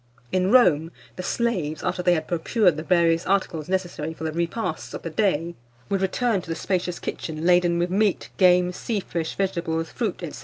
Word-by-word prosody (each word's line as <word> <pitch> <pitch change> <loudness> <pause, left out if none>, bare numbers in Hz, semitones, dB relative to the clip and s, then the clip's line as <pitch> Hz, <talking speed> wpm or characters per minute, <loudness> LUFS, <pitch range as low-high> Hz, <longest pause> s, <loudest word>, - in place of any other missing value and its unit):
In 185 0 +1
Rome, 175 - +4 0.2
the - - -5
slaves, 180 -8 -1
after 180 - -1
they 180 0 +3
had 155 -1 -3
procured 180 +1 +2
the 155 - -4
various 165 -1 +3
articles 180 -5 0
necessary 175 -4 -2
for - - -9
the 160 - -1
repasts 170 +2 -3
of - - -7
the 165 - -4
day, 170 -3 0 0.4
would 195 -1 0
return 200 +2 +1
to 175 - -13
the 165 - -1
spacious 180 -1 -2
kitchen 160 0 -5
laden 175 -1 +4
with 175 +1 0
meat, 205 0 +1
game, 180 -1 +5
sea 210 +4 -3
fish, 165 -3 -4
vegetables, 170 -4 -2
fruit, 215 -7 -3
&c. - - -8
180 Hz, 190 wpm, -24 LUFS, 165-190 Hz, 0.4 s, game